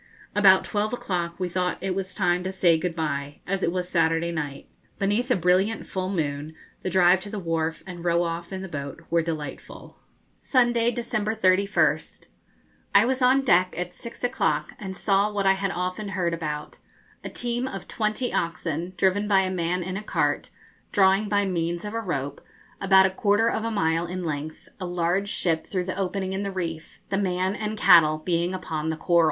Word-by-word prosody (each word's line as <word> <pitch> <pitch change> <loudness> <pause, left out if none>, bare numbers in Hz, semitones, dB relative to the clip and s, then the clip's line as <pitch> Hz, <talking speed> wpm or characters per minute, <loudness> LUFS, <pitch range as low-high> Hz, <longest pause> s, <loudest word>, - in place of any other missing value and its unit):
About 195 -2 +6
twelve 210 +1 -1
o'clock 175 -7 -3
we 185 - 0
thought 180 0 -1
it 190 0 -2
was 185 -1 -4
time 180 -2 +1
to 190 - -2
say 180 -3 +4
good 170 +1 -2
bye, 145 -3 -3
as 195 +1 -1
it 170 - +1
was 180 0 -2
Saturday 165 -1 +1
night. 145 -4 -5 0.3
Beneath 205 +6 0
a 250 - +4
brilliant 185 +5 +2
full 185 -1 -3
moon 155 -4 -3 0.3
the 185 - -2
drive 180 0 +5
to 205 - -8
the 210 - -5
wharf 165 -3 -2
and 175 -2 -8
row 170 0 +2
off 170 +1 -4
in 190 0 -5
the - - -5
boat 140 -2 -6
were 170 0 +4
delightful. 155 -4 -6 0.4
Sunday, 240 -3 +2
December 225 -3 -2
31st. 185 -6 +2 0.7
I 200 +2 +7
was 260 +1 0
on 260 +2 +4
deck 185 -7 +3
at 180 0 -4
six 235 +6 -9
o'clock, 155 -11 0
and 190 -2 -6
saw 200 +1 +2
what 200 -1 -1
I 195 - +6
had 195 0 -2
often 185 +3 -3
heard 170 -2 0
about 150 -3 -5 0.4
a - - -5
team 240 +1 -2
of 195 -7 -7
twenty 215 +3 -1
oxen, 170 +1 -2
driven 195 +4 +2
by 195 -2 +4
a 185 -1 -1
man 180 0 -1
in 185 +2 -4
a 210 - -6
cart, - - 0 0.4
drawing 195 0 +3
by 205 -1 +2
means 170 -1 -2
of 210 - -5
a 230 - -1
rope, 145 -8 -3 0.4
about 190 -1 +6
a 190 - +2
quarter 205 +4 +2
of 220 - -2
a 230 - -1
mile 165 -5 0
in 180 +1 -4
length, 155 -1 -5
a 185 - -4
large 175 +3 0
ship 165 -5 0
through 185 -2 -2
the 185 - -3
opening 190 0 -2
in 190 - -2
the 200 - -2
reef, 165 -4 -5
the 195 - 0
man 185 -1 0
and 215 0 -4
cattle 155 -5 +6
being 170 +3 -1
upon 160 -3 -3
the 160 - -2
coral. 170 +1 +2
185 Hz, 195 wpm, -25 LUFS, 170-200 Hz, 0.7 s, I